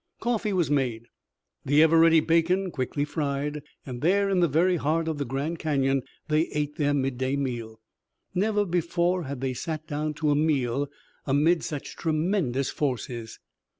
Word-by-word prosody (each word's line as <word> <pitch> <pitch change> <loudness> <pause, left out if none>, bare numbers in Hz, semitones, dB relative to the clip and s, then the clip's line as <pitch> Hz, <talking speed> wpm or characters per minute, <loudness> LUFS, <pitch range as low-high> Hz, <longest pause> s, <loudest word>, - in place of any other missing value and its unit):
Coffee 230 -3 -1
was 175 -5 +1
made, 120 -5 -1 0.5
the 145 +3 +5
ever 160 0 +4
ready 165 -1 +6
bacon 175 +4 +2
quickly 145 +1 -2
fried 145 -1 -2 0.2
and 125 -2 -6
there 195 +4 +2
in 190 - +2
the 175 - +4
very 175 +5 +2
heart 160 +2 0
of 155 -2 -2
the 140 - -1
Grand 140 +6 -3
Canyon 135 -3 +1 0.3
they 155 +2 +2
ate 150 0 -2
their 145 -1 +1
midday 130 -1 -1
meal. 120 -5 -4 0.5
Never 205 +2 +1
before 175 0 0
had 135 -1 -5
they 135 -1 -1
sat 155 +4 -4
down 150 0 -3
to 150 0 +1
a - - +3
meal 140 -3 +1 0.4
amid 155 +5 +3
such 145 -3 -5
tremendous 155 -5 0
forces. 120 -4 -3
150 Hz, 160 wpm, -26 LUFS, 135-165 Hz, 0.5 s, ready